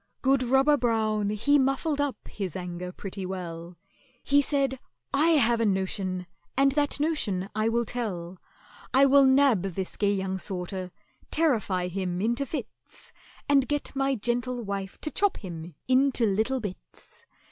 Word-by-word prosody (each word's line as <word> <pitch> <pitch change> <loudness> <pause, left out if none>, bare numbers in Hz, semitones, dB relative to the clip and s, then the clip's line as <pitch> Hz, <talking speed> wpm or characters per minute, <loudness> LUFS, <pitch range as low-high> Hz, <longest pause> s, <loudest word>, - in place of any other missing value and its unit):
Good 270 0 +3
ROBBER 270 +4 +4
BROWN 215 -4 +1
he 285 +8 +3
muffled 275 +3 +1
up 275 -7 -3
his 190 -6 -5
anger 180 -1 -5
pretty 195 +1 -7
well: 175 -2 -6 0.5
He 285 +1 +4
said, 275 -2 0 0.3
"I 315 +3 +4
have 235 -3 +3
a - - +2
notion, 190 -1 -1 0.3
and 275 0 +5
that 290 0 0
notion 215 - 0
I 215 +1 +1
will 235 +1 +1
tell; 185 -7 -4 0.6
I 270 +1 +7
will 275 0 +6
nab 265 -6 +4
this 190 0 -4
gay 205 -1 +2
young 190 0 -2
sorter, 185 0 -5 0.4
terrify 215 - +1
him 180 -1 -3
into 235 +7 0
fits, 305 - -8 0.3
And 275 -3 +4
get 290 -1 -3
my 270 0 +1
gentle 245 +2 -2
wife 195 -2 -4
to 305 - -3
chop 405 -1 +1
him 170 -4 -8
into 260 -2 +3
little 220 +6 +1
bits. 205 -5 -9
225 Hz, 150 wpm, -27 LUFS, 190-275 Hz, 0.6 s, I